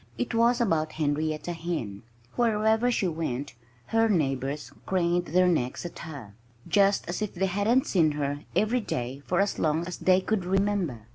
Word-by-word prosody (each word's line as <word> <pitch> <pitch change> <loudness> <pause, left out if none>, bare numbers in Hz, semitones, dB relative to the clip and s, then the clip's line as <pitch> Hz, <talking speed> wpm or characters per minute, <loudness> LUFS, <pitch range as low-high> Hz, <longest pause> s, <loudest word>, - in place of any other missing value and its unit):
It 120 - -2
was 235 +2 +3
about 160 -9 +1
Henrietta 155 +2 -1
Hen. 160 - -4 0.3
Wherever 220 0 +2
she 220 -6 +1
went 145 -5 -3 0.3
her 225 - +2
neighbors 140 - -1 0.2
craned 175 -1 +1
their 180 +3 +3
necks 155 -4 0
at 175 - -7
her, 140 -11 -8 0.3
just 200 -1 +3
as 175 +5 -3
if 210 -2 -3
they 190 +2 +1
hadn't 205 +7 +2
seen 160 -5 +2
her 145 -1 -2 0.2
every 235 +4 +2
day 130 - -4
for 180 - +1
as 200 0 0
long 160 +2 +1
as 180 - -6
they 185 0 +4
could 195 0 -1
remember. 190 - 0
175 Hz, 165 wpm, -27 LUFS, 150-205 Hz, 0.3 s, they